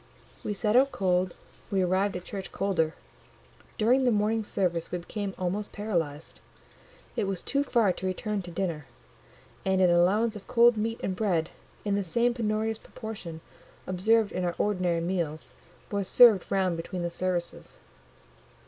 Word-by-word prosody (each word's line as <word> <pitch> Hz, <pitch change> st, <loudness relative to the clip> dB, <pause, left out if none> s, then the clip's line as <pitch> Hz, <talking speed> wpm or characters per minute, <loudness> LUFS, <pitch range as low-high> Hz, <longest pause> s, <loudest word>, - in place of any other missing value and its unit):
We 210 Hz, -, -2 dB
set 210 Hz, +2 st, +1 dB
out 270 Hz, +2 st, +5 dB
cold, 185 Hz, -1 st, 0 dB, 0.3 s
we 195 Hz, -2 st, +1 dB
arrived 190 Hz, +2 st, +1 dB
at 180 Hz, -, -9 dB
church 195 Hz, 0 st, -6 dB
colder: 170 Hz, -5 st, 0 dB, 0.8 s
during 245 Hz, +4 st, +4 dB
the 255 Hz, -, +3 dB
morning 220 Hz, 0 st, +1 dB
service 175 Hz, -5 st, -1 dB
we 180 Hz, -, -1 dB
became 195 Hz, +3 st, -5 dB
almost 190 Hz, +3 st, -2 dB
paralysed. 165 Hz, -8 st, -3 dB, 0.8 s
It 225 Hz, -4 st, 0 dB
was 195 Hz, -2 st, -2 dB
too 280 Hz, 0 st, +1 dB
far 230 Hz, -8 st, +2 dB
to 185 Hz, -, -4 dB
return 205 Hz, +2 st, -2 dB
to 180 Hz, -, -9 dB
dinner, 170 Hz, -5 st, -3 dB, 0.8 s
and 190 Hz, 0 st, +1 dB
an 180 Hz, -2 st, +5 dB
allowance 205 Hz, +6 st, +3 dB
of 205 Hz, -, -10 dB
cold 240 Hz, 0 st, +5 dB
meat 225 Hz, +2 st, -2 dB
and 190 Hz, -, -1 dB
bread, 180 Hz, -6 st, 0 dB, 0.3 s
in 205 Hz, -, +1 dB
the 200 Hz, 0 st, +1 dB
same 235 Hz, +7 st, +2 dB
penurious 220 Hz, -1 st, -1 dB
proportion 185 Hz, -10 st, -8 dB, 0.4 s
observed 210 Hz, +4 st, +2 dB
in 185 Hz, -, -2 dB
our 175 Hz, -1 st, -1 dB
ordinary 180 Hz, -5 st, +1 dB
meals, 170 Hz, -3 st, -2 dB, 0.4 s
was 200 Hz, -2 st, -1 dB
served 225 Hz, -6 st, +6 dB
round 185 Hz, -3 st, +1 dB
between 175 Hz, +2 st, -4 dB
the 170 Hz, -, -2 dB
services. 175 Hz, -1 st, -3 dB
195 Hz, 155 wpm, -28 LUFS, 175-215 Hz, 0.8 s, served